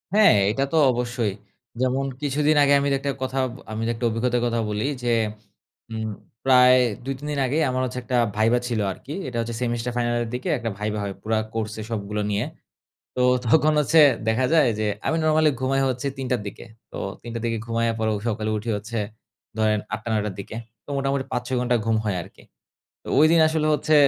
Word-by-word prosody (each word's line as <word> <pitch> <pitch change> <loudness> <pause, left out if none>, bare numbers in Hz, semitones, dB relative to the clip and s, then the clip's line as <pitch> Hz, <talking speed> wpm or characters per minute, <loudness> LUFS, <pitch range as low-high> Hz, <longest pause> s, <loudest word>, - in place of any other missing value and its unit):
হ্যাঁ, 210 - +7 0.2
এটা 135 +5 0
তো 160 - +3
অবশ্যই। 120 -4 -1 0.5
যেমন 130 +2 +1 0.2
কিছুদিন 150 +2 +2
আগে 140 0 +4
আমির 140 0 +1
একটা 140 0 -1
কথা 130 +1 -3 0.3
আমি 110 +1 -3
একটা 115 +1 -3
অভিজ্ঞতার 120 +2 0
কথা 115 -1 0
বলি, 105 +2 -1 0.2
যে - - -2 0.9
উম 110 0 -3 0.4
প্রায় 125 -1 +7 0.3
২ 135 +1 -2
৩ 150 - -8
দিন 145 - -2
আগেই 155 +5 +1
আমার 130 0 -1
হচ্ছে 125 0 -4
একটা 125 +1 -1 0.2
ভাইভা 115 +3 +3
ছিল 115 -3 -1
আরকি। 140 +10 -9
এটা 120 - -6
হচ্ছে 115 0 -3
সেমিস্টার 120 0 -1
ফাইনালের 120 -1 0
দিকে 125 - -3
একটা 115 0 -3
ভাইভা 105 0 -2
হয় 100 -1 -4
পুরা 110 0 0 0.2
কোর্সে 110 -1 -3
সবগুলো 105 -1 -3
নিয়ে। 105 +3 0 0.7
তো - - -3 0.3
তখন 155 +5 +4
হচ্ছে 155 +2 +4 0.3
দেখা 115 +4 +2
যায় 155 -5 +5
যে, 110 - 0 0.2
আমি 160 - +1
নরমালি 155 0 +4
ঘুমাই 135 +1 +1
হচ্ছে 130 +2 -2
৩ঃ০০ 130 -1 -1
র - - -7
দিকে। 100 - -9 0.3
তো - - -7 0.2
৩ঃ০০ 115 0 -5
র - - -8
দিকে 115 -1 0
ঘুমাইয়া 115 0 0
পরেও 110 -1 +1
সকালে 110 -1 -1
উঠি 110 +3 -5
হচ্ছে 110 +3 -6 0.6
ধরেন 110 -1 +2
৮ঃ০০ 110 +2 -4
৯ঃ০০ 105 -1 0
র - - -9
দিকে। 100 +2 -7 0.3
তো - - -14
মোটামুটি 135 0 0
৫ 125 - 0
৬ 130 - -1
ঘন্টা 125 0 +1
ঘুম 110 -1 +2
হয় 100 - 0
আরকি। - - -14 0.6
তো - - -22
ওইদিন 160 +2 +6
আসলে 155 -1 0
হচ্ছে 155 +2 +1
120 Hz, 195 wpm, -24 LUFS, 110-135 Hz, 0.9 s, হ্যাঁ